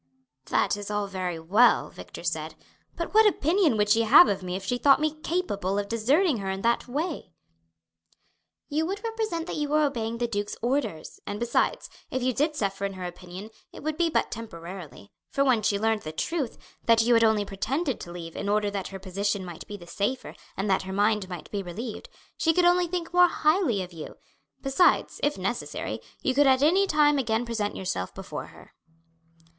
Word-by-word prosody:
"That - - +2
is 205 0 -6
all 205 -1 -1
very 185 -3 -3
well," 200 +10 +3
Victor - - -10
said; - - -3 0.4
"but 335 - -4
what 440 0 +7
opinion 335 - +2
would 210 0 +2
she 225 - +5
have 260 +10 +8
of 195 - -1
me 180 0 -4
if 190 0 -5
she 245 +5 -1
thought 275 +2 +6
me 305 0 0
capable 205 - -1
of 205 0 -1
deserting 265 - +2
her 195 -2 -4
in 190 0 -3
that 235 +2 +1
way?" 290 - -4 1.3
"You 315 +2 0
would 400 +4 -4
represent 440 -7 -2
that - - -5
you 295 -1 -1
were 305 +1 +3
obeying 230 -4 -2
the 240 - 0
duke's 205 -2 -3
orders; 240 - -2
and 205 +1 -4
besides, 235 0 0 0.2
if 260 -3 -2
you 255 0 +1
did 300 +5 0
suffer 200 -6 -2
in 200 0 -1
her 185 -1 -6
opinion 180 +4 -8 0.2
it - - -11
would 310 0 -1
be 335 +1 +1
but - - 0
temporarily, 170 - -8 0.2
for 275 - +1
when 250 -5 +3
she 200 -1 +1
learned 220 +1 +1
the 155 - -6
truth, 275 - -2 0.3
that 230 -1 +5
you 240 +1 +3
had 230 0 +5
only 220 -2 +3
pretended 260 - -2
to 175 - -8
leave 170 -1 -8
in 200 - -3
order 205 0 +1
that 195 -2 -3
her 195 - -7
position 195 +1 -2
might 175 -2 -9
be 205 - -7
the 175 - -13
safer 205 +9 -3 0.2
and 195 +2 -1
that 190 -1 +2
her 190 0 -6
mind 205 -1 +1
might 175 -3 -8
be 205 - -2
relieved, 210 +5 -7 0.3
she 325 - +2
could 355 +1 +3
only 355 0 +4
think 345 0 -4
more 355 0 +7
highly 310 - +1
of 180 0 -11
you. 160 -2 -8 0.5
Besides, 270 +7 +3
if 290 -5 +1
necessary, 195 +6 -3 0.2
you 260 - +2
could 285 +1 +4
at 265 +1 +4
any 375 +6 +4
time 295 -3 +4
again 225 -2 0
present 220 -3 -2
yourself 95 - -3
before - - -6
her." - - -16
225 Hz, 205 wpm, -27 LUFS, 195-295 Hz, 1.3 s, have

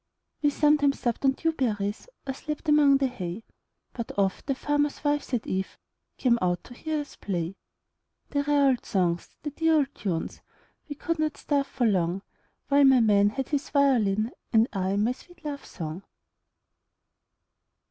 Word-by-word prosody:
We 295 - +4
sometimes 290 -1 +3
supped 240 +1 -1
on 270 - +5
dew 325 +4 0
berries, 210 - -2 0.2
Or 270 - -2
slept 300 +4 -6
among 295 -2 +6
the 270 - +1
hay, 205 -5 -4 0.5
But 235 -2 -5
oft 195 +3 0
the 275 - +1
farmers' 290 +2 0
wives 290 -1 0
at 245 -4 0
eveCame 235 +5 -2
out 180 -1 0
to 245 - -12
hear 310 +4 -2
us 290 - -10
play; 175 -2 -3 0.8
The 285 - +1
rare 285 -1 +3
old 255 -2 0
songs, 175 -4 0
the 295 - -3
dear 325 +2 +2
old 285 -2 +1
tunes,—We 195 - -6
could 330 +3 -2
not 310 -1 0
starve 280 -2 0
for 250 -3 -1
longWhile 185 -2 +1 0.6
my 265 -1 +6
man 205 -3 +4
had 265 +5 -4
his 290 -2 -1
violin, 230 -6 +2 0.2
And 225 0 +5
I 190 0 0
my 210 +4 +2
sweet 345 +6 -13
love 285 -2 -4
song. 160 +1 -6
260 Hz, 160 wpm, -27 LUFS, 200-290 Hz, 0.8 s, among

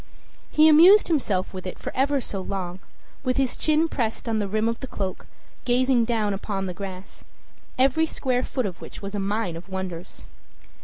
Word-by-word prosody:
He 310 +1 +5
amused 350 +8 +7
himself 210 - 0
with 185 0 -6
it 185 - -6
for - - -7
ever 280 +2 +2
so 200 -5 -5
long, 185 -2 -4 0.4
with 255 -1 0
his 270 -2 +1
chin 310 +1 +2
pressed 235 -6 -2
on 225 -1 0
the 205 - -1
rim 215 +3 0
of 230 0 -1
the 265 - -6
cloak, 190 -6 -5 0.4
gazing 250 -1 +3
down 220 -3 0
upon 195 0 -3
the 180 - -4
grass, 190 0 -8 0.5
every 275 +5 +3
square 255 -5 -1
foot 255 -1 -2
of 185 -4 -5
which - - -10
was 200 +1 -5
a 205 - -2
mine 200 -2 -1
of 170 +4 -10
wonders. 185 -2 -6
220 Hz, 190 wpm, -25 LUFS, 190-265 Hz, 0.5 s, amused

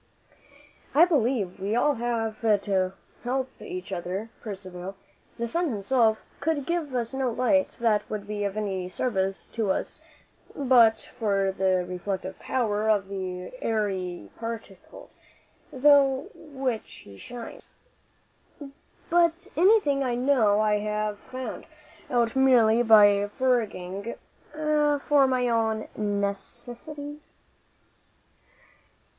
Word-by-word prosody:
"I 325 +4 +8
believe 245 - 0
we 200 +3 -2
have 245 +1 +2
all 225 -3 +1
to 190 -2 0 0.3
help 260 +1 -1
each 185 +1 -6
other, 185 +5 -4
Percivale. 190 -3 -7 0.4
The 235 - -2
sun 340 +7 0
himself 220 0 +2 0.2
could 305 -3 -1
give 335 -6 -2
us 235 0 -2
no 265 -1 0
light 255 +5 +1
that 225 -3 +1
would 210 -1 -4
be 205 0 -3
of 200 +1 -2
any 190 -4 -2
service 195 -2 -1
to 220 -3 -2
us - - -2 0.5
but 240 -5 +4
for 195 -3 +1
the 185 -1 +1
reflective 185 +1 -4
power 220 -4 0
of 200 -3 +2
the 185 -2 -5
airy 190 - -2
particles 225 -5 -8 0.5
through 280 -1 +4
which 270 -8 -5
he 100 -1 -13
shines. 240 -2 -9 1.4
But 345 +2 +2
anything 340 -6 +4
I 245 -2 0
know 240 -5 +3
I 210 -1 +2
have 210 0 -2
found 255 -3 -7 0.4
out 235 -1 +1
merely 240 -4 +5
by 205 -3 +6
foraging 220 -5 -1 0.4
for 295 -2 +2
my 255 -1 +1
own 225 -2 0
necessities." 240 +9 -5
225 Hz, 110 wpm, -26 LUFS, 200-265 Hz, 1.4 s, I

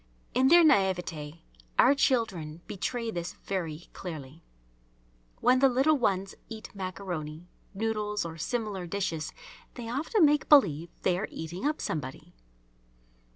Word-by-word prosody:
In 255 +2 +4
their 340 +4 +8
naïveté 180 - +1 0.4
our 270 - +7
children 190 - 0
betray 230 +3 -3
this 175 -2 -4
very 170 -4 -4
clearly. 155 -3 -8 1.0
When 250 +2 +5
the 270 0 +6
little 270 +5 +3
ones 195 -7 0 0.2
eat 220 -1 -8
maccaroni, 175 -4 -5 0.3
noodles, 210 -2 -1
or 165 -1 -6
similar 210 -3 -2
dishes, 170 -4 -2 0.4
they 240 -2 -6
often 315 - +3
make 295 -1 +2
believe 170 - +5
they 180 -1 +2
are 215 - -2
eating 170 - -4
up 305 - -1
somebody. 135 -4 -5
195 Hz, 125 wpm, -29 LUFS, 165-245 Hz, 1.0 s, their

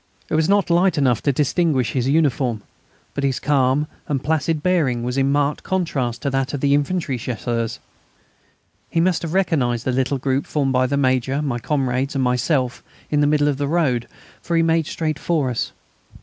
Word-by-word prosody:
It - - -1
was 155 +2 +2
not 200 -3 +2
light 180 +1 +3
enough 130 -6 +2
to 140 - +2
distinguish 145 -2 +1
his 130 0 0
uniform, 135 -7 +1 0.5
but 140 - -3
his 135 -2 0
calm 140 0 +2 0.2
and 140 -2 -2
placid 160 0 0
bearing 150 -10 +1
was 125 +1 -2
in 135 0 +2
marked 145 0 +1
contrast 140 -11 -2
to 140 - 0
that 135 +1 -1
of - - -3
the 140 +1 +2
infantry 145 -2 0
Chasseurs. 115 0 -3 1.1
He 165 - 0
must 175 0 +2
have 165 +1 -4
recognised 130 -11 +1
the 130 - +1
little 130 +2 0
group 135 +1 -1
formed 140 -3 0
by 130 0 +3
the 140 +2 -1
Major, 130 +1 +1
my 130 -5 -2
comrades, 135 0 -1
and 135 - +1
myself 125 0 0 0.3
in 150 -1 +2
the 145 - +4
middle 145 0 +2
of 145 -2 0
the 145 0 -1
road, 140 -7 +1 0.3
for 170 - -2
he 165 - +4
made 165 -1 +2
straight 155 -2 -2
for 150 -7 0
us. 120 - -2
140 Hz, 190 wpm, -21 LUFS, 130-155 Hz, 1.1 s, the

